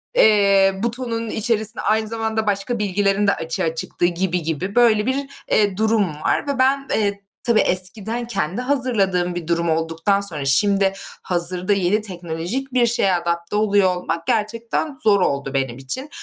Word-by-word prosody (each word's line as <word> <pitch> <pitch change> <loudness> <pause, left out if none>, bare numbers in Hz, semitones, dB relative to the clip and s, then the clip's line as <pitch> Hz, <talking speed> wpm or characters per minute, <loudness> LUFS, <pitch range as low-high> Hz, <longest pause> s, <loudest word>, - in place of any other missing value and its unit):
eee, 200 - +4
butonun 235 -1 -2
içerisine 220 0 0
aynı 220 0 0
zamanda 220 -1 -2
başka 205 +4 -1
bilgilerin 200 0 +1
de 200 - +3
açığa 160 0 -3
çıktığı 170 - -2
gibi 175 +1 -1
gibi 165 +5 -3
böyle 225 -3 +4
bir, 270 +2 -1 0.2
eee, 205 -3 +2
durum 220 -2 +2 0.2
var - - 0
ve 280 -2 -2
ben, 275 +1 +2
eee, 200 -2 -1 0.2
tabii 235 -3 +3
eskiden 205 +6 0
kendi 195 -1 -2
hazırladığım 205 -10 0
bir 175 -2 -5
durum 170 0 0
olduktan 165 +5 0
sonra 160 -8 -1
şimdi 195 +7 +3 0.3
hazırda 180 +2 0
yeni 200 +2 +1
teknolojik 185 +7 -4
bir 250 -2 +4
şeye 225 -5 +3
adapte 170 +1 -2
oluyor 205 -3 +2
olmak 170 -2 -4
gerçekten 230 +7 -2
zor 200 -2 +4
oldu 140 -3 -1
benim 135 -3 -2
için. 135 - -3
200 Hz, 155 wpm, -20 LUFS, 175-225 Hz, 0.3 s, eee